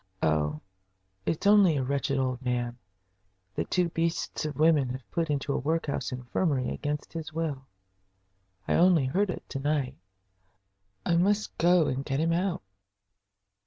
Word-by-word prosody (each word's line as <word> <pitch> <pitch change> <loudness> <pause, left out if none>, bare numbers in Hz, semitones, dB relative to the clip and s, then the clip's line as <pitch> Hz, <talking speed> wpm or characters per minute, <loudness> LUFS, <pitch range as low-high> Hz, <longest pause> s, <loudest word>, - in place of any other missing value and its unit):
"Oh, 75 -1 +1 0.7
it's 165 - -1
only 200 -6 +6
a 135 - 0
wretched 140 +1 -1
old 130 -1 -1
man 120 -1 -2 0.7
that 80 - -3
two 180 -2 +2
beasts 165 -1 -2
of 150 - -3
women 155 -4 +4
have 130 0 -7
put 165 -1 -1
into 145 0 -1
the - - 0
workhouse 155 +1 -1
infirmary 125 +2 -1
against 150 0 -4
his 160 -2 -5
will. 150 -5 -3 1.0
I - - +1
only 175 -5 +5
heard 190 +10 +1
it - - -5
to 135 - -4
night. 140 -2 -1 1.1
I 170 - +2
must 205 +4 +1
go 175 0 +5
and 135 0 -1
get 135 -1 -2
him 165 +1 +2
out." 175 - -1
150 Hz, 150 wpm, -28 LUFS, 130-165 Hz, 1.1 s, only